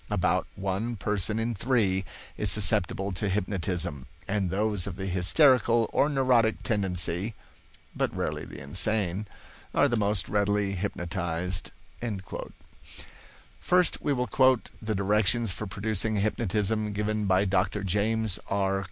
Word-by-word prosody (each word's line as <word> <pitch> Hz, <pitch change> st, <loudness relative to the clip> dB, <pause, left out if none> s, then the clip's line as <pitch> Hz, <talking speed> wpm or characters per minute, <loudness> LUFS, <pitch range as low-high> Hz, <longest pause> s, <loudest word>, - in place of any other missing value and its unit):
About -, -, +1 dB
one 100 Hz, +5 st, -2 dB
person 105 Hz, +1 st, -1 dB
in 115 Hz, +1 st, -1 dB
three 100 Hz, -4 st, +1 dB, 0.3 s
is 105 Hz, -, 0 dB
susceptible 95 Hz, 0 st, +3 dB
to 95 Hz, +2 st, -2 dB
hypnotism, 90 Hz, -8 st, -2 dB, 0.2 s
and 100 Hz, -2 st, 0 dB
those 100 Hz, 0 st, 0 dB
of 95 Hz, -, -5 dB
the 95 Hz, +1 st, -5 dB
hysterical 115 Hz, -, +4 dB
or 145 Hz, -, +3 dB
neurotic 130 Hz, -5 st, +2 dB
tendency 95 Hz, -1 st, -1 dB, 0.6 s
(but -, -, 0 dB
rarely -, -, -2 dB
the -, -, -10 dB
insane) 95 Hz, +6 st, 0 dB, 0.5 s
are -, -, +5 dB
the 120 Hz, -, 0 dB
most 105 Hz, -3 st, 0 dB
readily 100 Hz, -1 st, +1 dB
hypnotized." 85 Hz, -2 st, -2 dB, 1.9 s
First 180 Hz, 0 st, +2 dB
we 145 Hz, -, 0 dB
will 125 Hz, -2 st, 0 dB
quote 130 Hz, -2 st, +2 dB
the 110 Hz, -1 st, -2 dB
directions 105 Hz, +3 st, +1 dB
for 105 Hz, +3 st, -5 dB
producing 110 Hz, +2 st, -1 dB
hypnotism 105 Hz, 0 st, 0 dB
given 105 Hz, 0 st, -1 dB
by 95 Hz, +1 st, +3 dB
Dr. 95 Hz, +1 st, 0 dB
James 105 Hz, +2 st, 0 dB
R. 95 Hz, -1 st, +1 dB
105 Hz, 125 wpm, -27 LUFS, 95-110 Hz, 1.9 s, are